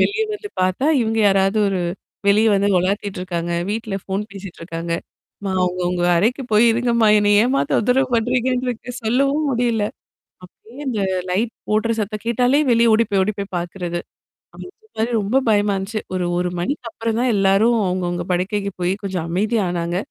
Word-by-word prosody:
வெளிய 410 Hz, +2 st, +2 dB
வந்து 415 Hz, 0 st, -6 dB
பார்த்தா, 185 Hz, +9 st, +1 dB
இவுங்க 225 Hz, -1 st, 0 dB
யாராவது 195 Hz, +2 st, +2 dB
ஒரு 190 Hz, -2 st, -1 dB, 0.5 s
வெளிய 210 Hz, +2 st, +4 dB
வந்து 200 Hz, +1 st, +2 dB
உலாத்திட்டு 195 Hz, +1 st, -2 dB
இருக்காங்க. 175 Hz, -2 st, -3 dB, 0.2 s
வீட்ல 215 Hz, -1 st, -3 dB
ஃபோன் 195 Hz, +1 st, -2 dB
பேசிட்டு 195 Hz, -2 st, -10 dB
இருக்காங்க. 165 Hz, 0 st, -4 dB, 0.5 s
மா 195 Hz, -, -1 dB
அவுங்க, 180 Hz, 0 st, -1 dB
அவுங்க 175 Hz, 0 st, 0 dB
அறைக்கு 235 Hz, +9 st, +1 dB
போய் 215 Hz, +2 st, +6 dB
இருங்கம்மா! 235 Hz, -1 st, +2 dB
என்னைய 205 Hz, 0 st, +4 dB
ஏம்மா 275 Hz, +2 st, +1 dB
தொந்தரவு 255 Hz, +4 st, +2 dB
பண்றீங்கன்ட்டு 250 Hz, +2 st, 0 dB
இருக்கு 245 Hz, 0 st, -5 dB
சொல்லவும் 275 Hz, +7 st, +1 dB
முடியல. 235 Hz, -3 st, +1 dB, 0.6 s
அப்பிடியே 225 Hz, +7 st, -15 dB
அந்த 225 Hz, -5 st, -1 dB, 0.3 s
லைட் 220 Hz, +6 st, 0 dB, 0.2 s
போடுற 215 Hz, +2 st, +1 dB
சத்தம் 210 Hz, 0 st, -3 dB
கேட்டாலே 250 Hz, +4 st, +2 dB
வெளிய 230 Hz, -1 st, +4 dB
ஓடி 225 Hz, +1 st, +4 dB
போய் 195 Hz, -1 st, +3 dB
ஓடி 215 Hz, +3 st, -1 dB
போய் 200 Hz, -1 st, -6 dB
பார்க்கிறது. 175 Hz, 0 st, -4 dB, 0.6 s
அந்தமாரி 370 Hz, -, -6 dB
ரொம்ப 210 Hz, +5 st, -1 dB
பயமா 205 Hz, -1 st, +3 dB
இருந்துச்சு. 200 Hz, +3 st, -4 dB
ஒரு, 185 Hz, -1 st, -1 dB
1 180 Hz, 0 st, 0 dB
மணிக்கு 250 Hz, -, -3 dB
அப்புறம் 225 Hz, 0 st, -2 dB
தான் 250 Hz, -1 st, +2 dB
எல்லாரும் 200 Hz, +4 st, +3 dB
அவங்கவுங்க 175 Hz, -1 st, -2 dB
படுக்கைக்கு 200 Hz, +3 st, -1 dB
போய் 180 Hz, +1 st, +1 dB
கொஞ்சம் 185 Hz, -4 st, -3 dB
அமைதி 210 Hz, +6 st, 0 dB
ஆனாங்க. 175 Hz, 0 st, -2 dB
210 Hz, 165 wpm, -20 LUFS, 185-235 Hz, 0.6 s, போய்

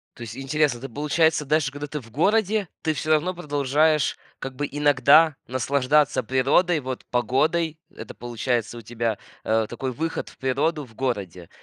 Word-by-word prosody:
То -, -, -15 dB
есть 115 Hz, 0 st, -7 dB
интересно, 140 Hz, -1 st, +1 dB
это 135 Hz, +3 st, -8 dB
получается, 150 Hz, +4 st, +1 dB
даже 150 Hz, -1 st, +1 dB
когда 145 Hz, +1 st, -6 dB
ты 150 Hz, +1 st, -5 dB
в 115 Hz, -4 st, -15 dB
городе, 205 Hz, -, +2 dB, 0.2 s
ты 160 Hz, -, +1 dB
всё 155 Hz, +1 st, -4 dB
равно 155 Hz, +4 st, +2 dB
продолжаешь 150 Hz, -1 st, +1 dB, 0.2 s
как 135 Hz, -1 st, -7 dB
бы 145 Hz, +3 st, -2 dB
иногда 145 Hz, +2 st, +5 dB
наслаждаться 135 Hz, +3 st, +2 dB
природой 140 Hz, +7 st, +2 dB
вот, 130 Hz, -1 st, -5 dB
погодой. 155 Hz, +7 st, +1 dB, 0.2 s
Это -, -, -8 dB
получается, 120 Hz, -1 st, -2 dB
у -, -, -8 dB
тебя, 115 Hz, -1 st, -2 dB, 0.3 s
э, 110 Hz, 0 st, +2 dB
такой 130 Hz, +2 st, -4 dB
выход 165 Hz, +6 st, -3 dB
в -, -, -18 dB
природу 145 Hz, +4 st, 0 dB
в 120 Hz, -5 st, -15 dB
городе. 100 Hz, -10 st, -3 dB
140 Hz, 165 wpm, -24 LUFS, 125-155 Hz, 0.3 s, иногда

